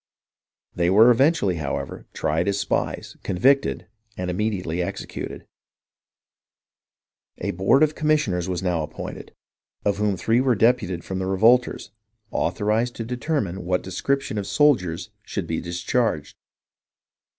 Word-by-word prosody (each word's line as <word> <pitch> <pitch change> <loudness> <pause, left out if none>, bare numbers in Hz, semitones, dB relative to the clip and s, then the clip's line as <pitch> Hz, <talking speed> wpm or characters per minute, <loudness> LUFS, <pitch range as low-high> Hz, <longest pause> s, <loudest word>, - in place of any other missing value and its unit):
They 85 0 +1
were 110 +6 +7
eventually, 125 - +3
however, 75 -3 -4
tried 80 +5 -1
as 100 0 +1
spies, - - -2
convicted, 135 +10 +2 0.3
and 90 0 -2
immediately 90 -4 -1
executed. 85 - -5 1.9
A - - -2
board 95 - +3
of 155 0 +2
commissioners 145 - +1
was 90 0 -2
now 90 -3 0
appointed, 75 - -7 0.5
of 100 -1 +2
whom 105 -2 0
three 115 +7 +2
were 130 -2 +2
deputed 105 -6 +2
from 95 0 -4
the 95 - -2
revolters, 115 +6 +3 0.4
authorized 110 +3 0
to 115 - -5
determine 120 - -2
what 90 +1 0
description 120 +5 -1
of 100 - -4
soldiers 100 - +2
should 100 -3 -4
be 80 -1 -2
discharged. 85 - -1
100 Hz, 125 wpm, -23 LUFS, 90-125 Hz, 1.9 s, were